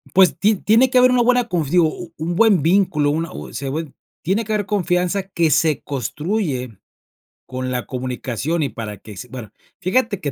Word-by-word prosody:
Pues, 190 -2 +5
ti 210 +1 +3
tiene 225 +7 +3
que 255 - +2
haber 250 0 +6
una 250 -1 +3
buena 245 0 +3
conf 170 - -1
digo, 165 -1 +3 0.3
un 165 +3 -3
buen 205 -5 +4
vínculo, 165 -4 +2
una, 165 +2 -2 0.2
eh, - - -14
se 140 - -4
buen 155 +1 -4 0.3
tiene 195 +7 0
que 215 - -2
haber 205 -2 0
confianza 185 -1 0
que 170 -4 0
se 155 -3 +2
construye 140 - -3 0.7
con 130 0 -4
la 125 -1 -2
comunicación 130 +5 -3
y 140 - -1
para 110 -3 -7
que 105 0 -12
se 125 - -8
bueno, 120 -6 -8 0.3
fíjate 200 +2 0
que 145 - -2
165 Hz, 190 wpm, -20 LUFS, 135-205 Hz, 0.7 s, haber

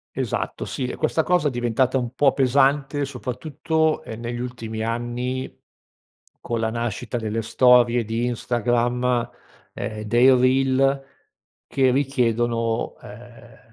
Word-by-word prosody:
Esatto, - - -3
sì, 130 - -3
e - - -5
questa 160 - +1
cosa 175 -4 +2
è - - -1
diventata 120 +2 0
un 120 0 -4
po' 140 -1 +3
pesante 140 +2 +2
soprattutto, 155 +4 -2
ehm, 110 +1 -8
negli 120 0 -4
ultimi 115 -3 -5
anni 120 +3 -3 0.9
con 115 -1 -3
la 110 0 0
nascita 120 0 -3
delle 110 0 -2
storie 120 0 +4
di 115 +2 -2
Instagram, 120 +1 0 0.4
ehm, 110 0 -5
dei 120 +5 +5
reel 135 +2 +2 0.6
che 130 -2 +2
richiedono, 120 -4 0
ehm, 120 +2 -13
125 Hz, 120 wpm, -23 LUFS, 115-135 Hz, 0.9 s, dei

